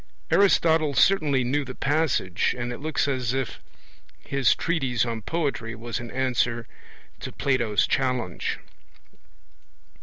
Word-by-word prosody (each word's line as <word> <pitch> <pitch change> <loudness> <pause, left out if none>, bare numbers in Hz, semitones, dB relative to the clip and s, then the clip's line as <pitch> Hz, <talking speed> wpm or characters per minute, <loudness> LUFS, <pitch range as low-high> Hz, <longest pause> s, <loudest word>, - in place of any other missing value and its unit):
Aristotle 160 -6 +4
certainly 150 -9 +3
knew 140 +4 0
the 130 -1 -8
passage, 140 - +1
and 120 0 -3
it - - -8
looks 155 0 -1
as 130 -2 -1
if 135 -2 -3 0.6
his 140 -3 +2
treatise 135 -9 0
on 115 -2 -3
poetry 135 -5 -2
was 120 0 -4
an 120 0 -7
answer 120 -2 0 0.5
to - - -6
Plato's 120 -6 +1
challenge. 125 -9 -1
130 Hz, 120 wpm, -25 LUFS, 120-145 Hz, 0.6 s, Aristotle